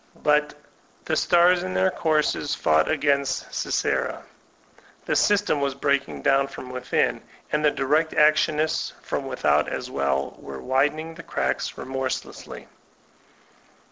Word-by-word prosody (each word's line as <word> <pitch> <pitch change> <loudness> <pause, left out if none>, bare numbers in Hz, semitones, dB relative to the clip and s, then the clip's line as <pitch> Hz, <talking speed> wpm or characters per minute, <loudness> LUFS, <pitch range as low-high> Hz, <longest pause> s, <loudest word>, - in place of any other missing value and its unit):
But 150 0 +2 0.5
''the - - 0
stars 175 +1 +4
in 95 0 -4
their 95 +1 +3
courses 155 -2 0
fought 80 0 +2
against 140 -3 0
Sisera'*; - - -1 0.8
the - - 0
system 205 -8 +2
was 140 -1 -1
breaking 140 0 -1
down 135 0 +3
from 130 -2 -9
within, 125 0 0 0.3
and 150 0 0
the 150 - +5
direct 150 +4 +1
actionists 155 0 +2
from - - -3
without, - - +1
as - - -5
well, 70 0 -1
were 70 -1 -8
widen 135 - +1
ing 160 +1 -7
the 170 - -10
cracks - - -2
remorselessly. 130 0 -5
140 Hz, 130 wpm, -24 LUFS, 130-155 Hz, 0.8 s, the